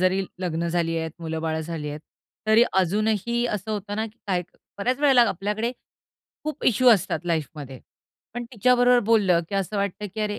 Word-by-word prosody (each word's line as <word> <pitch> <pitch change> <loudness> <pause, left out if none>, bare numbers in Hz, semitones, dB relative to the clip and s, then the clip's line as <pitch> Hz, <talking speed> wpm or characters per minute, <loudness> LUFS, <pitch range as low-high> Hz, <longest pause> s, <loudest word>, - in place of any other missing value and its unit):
जरी 185 +1 +2 0.2
लग्न 170 -1 -1
झाली 165 -1 0
आहेत, 160 0 -3
मुलं-बाळं 160 -1 -2
झाली 160 -2 -5
आहेत. 150 +1 -6 0.5
तरी 220 +2 +6 0.2
अजूनही 215 +5 0
असं 210 +2 -5
होतं 205 -1 -4
ना, 220 +1 -1
की 225 +2 -16
काय 180 -3 0
क - - -26 0.2
बऱ्याच 250 +6 0
वेळेला 270 -4 +6
आपल्याकडे 210 +6 -2 0.7
खूप 305 -1 -4
इश्यू 250 +2 +4
असतात 190 -4 +2
लाईफमध्ये. 150 -5 -3 0.5
पण 240 - -4
तिच्याबरोबर 245 +2 +4
बोललं 195 -7 +4
की 200 - -5
असं 195 +2 -1
वाटतं, 200 +1 -2
की 220 - -4
"अरे, 210 -1 -1
200 Hz, 175 wpm, -24 LUFS, 170-225 Hz, 0.7 s, तरी